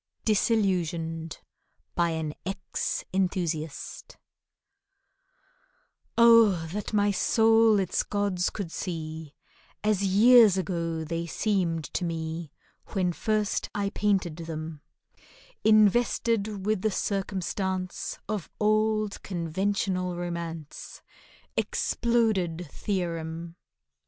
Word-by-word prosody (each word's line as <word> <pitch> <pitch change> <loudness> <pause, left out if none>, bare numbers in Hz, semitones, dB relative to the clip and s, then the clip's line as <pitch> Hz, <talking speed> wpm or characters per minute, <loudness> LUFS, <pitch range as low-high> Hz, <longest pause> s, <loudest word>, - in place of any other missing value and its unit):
DISILLUSIONED 175 -7 0 0.6
BY 170 0 +2
AN 160 -2 -3
EX 195 +1 -3
ENTHUSIAST 175 -5 -2 2.0
OH, 225 -8 +6
that 210 0 -4
my 205 -1 +3
soul 225 +1 +4
its 190 -3 0
gods 200 -3 0
could 190 -6 -6
see 160 -4 -5 0.5
As 210 -2 +2
years 210 +1 +6
ago 170 -3 -2
they 165 +2 -3
seemed 175 -4 0
to - - -1
me 165 -2 -4 0.4
When 185 -4 0
first 215 +2 -1
I 200 -1 -1
painted 195 -7 0
them; 160 -2 -6 0.8
Invested 215 -1 +3
with 215 -2 +1
the 220 - +2
circumstance 190 -2 -2
Of 210 -6 -3
old 215 0 +1
conventional 185 +1 -1
romance: 170 -3 -6 0.5
Exploded 200 -8 0
theorem! 170 -4 -3
185 Hz, 85 wpm, -27 LUFS, 165-210 Hz, 2.0 s, OH